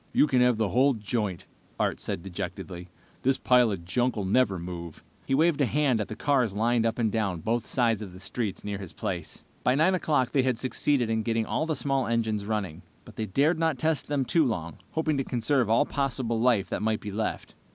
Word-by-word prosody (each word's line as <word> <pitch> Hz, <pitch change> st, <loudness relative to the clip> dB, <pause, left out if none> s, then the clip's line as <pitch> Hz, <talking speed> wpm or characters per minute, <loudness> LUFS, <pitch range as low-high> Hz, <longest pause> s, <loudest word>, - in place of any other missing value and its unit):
"You -, -, +5 dB
can 130 Hz, -4 st, +2 dB
have 125 Hz, -2 st, +4 dB
the 110 Hz, -3 st, +1 dB
whole 130 Hz, +5 st, +3 dB
joint," 105 Hz, -4 st, -3 dB, 0.3 s
Art -, -, 0 dB
said 85 Hz, -, -3 dB
dejectedly. 90 Hz, -1 st, -6 dB, 0.3 s
"This 135 Hz, +1 st, +2 dB
pile 125 Hz, -3 st, +4 dB
of 90 Hz, -4 st, -5 dB
junk 125 Hz, +7 st, 0 dB
will 105 Hz, -3 st, -2 dB
never 100 Hz, -1 st, +2 dB
move!" 85 Hz, -2 st, -7 dB, 0.2 s
He 135 Hz, -, +2 dB
waved 155 Hz, 0 st, +3 dB
a 135 Hz, -, +3 dB
hand 135 Hz, -3 st, +2 dB
at 105 Hz, -, -3 dB
the 110 Hz, -, -6 dB
cars 125 Hz, -5 st, +1 dB
lined 115 Hz, +1 st, +2 dB
up 115 Hz, -, -2 dB
and 115 Hz, -3 st, +1 dB
down 100 Hz, -6 st, -1 dB
both 115 Hz, +5 st, -1 dB
sides 115 Hz, -4 st, +1 dB
of 100 Hz, -3 st, -7 dB
the 90 Hz, -, -12 dB
streets 100 Hz, +2 st, -4 dB
near 100 Hz, -1 st, -4 dB
his 95 Hz, -4 st, -8 dB
place. -, -, -5 dB, 0.2 s
By 125 Hz, -, +3 dB
9 160 Hz, +6 st, +4 dB
o'clock 145 Hz, -8 st, +1 dB
they 135 Hz, -, +3 dB
had 130 Hz, -2 st, 0 dB
succeeded 130 Hz, -1 st, 0 dB
in 110 Hz, 0 st, +1 dB
getting 115 Hz, 0 st, 0 dB
all -, -, -1 dB
of 160 Hz, -, 0 dB
the 160 Hz, -, 0 dB
small 135 Hz, -2 st, 0 dB
engines 110 Hz, -3 st, -1 dB
running, 100 Hz, -7 st, -3 dB, 0.2 s
but -, -, -13 dB
they 110 Hz, -, -3 dB
dared 150 Hz, -, +2 dB
not 160 Hz, -4 st, +1 dB
test 155 Hz, 0 st, 0 dB
them 145 Hz, -2 st, 0 dB
too 165 Hz, +4 st, +3 dB
long, 85 Hz, -, -3 dB
hoping 155 Hz, -2 st, 0 dB
to 135 Hz, -, 0 dB
conserve 125 Hz, -1 st, +1 dB
all 115 Hz, +6 st, +4 dB
possible 130 Hz, -5 st, -1 dB
life 115 Hz, -5 st, +3 dB
that -, -, -2 dB
might 110 Hz, 0 st, 0 dB
be 105 Hz, -, -6 dB
left. 110 Hz, +2 st, -3 dB
115 Hz, 225 wpm, -27 LUFS, 105-135 Hz, 0.3 s, You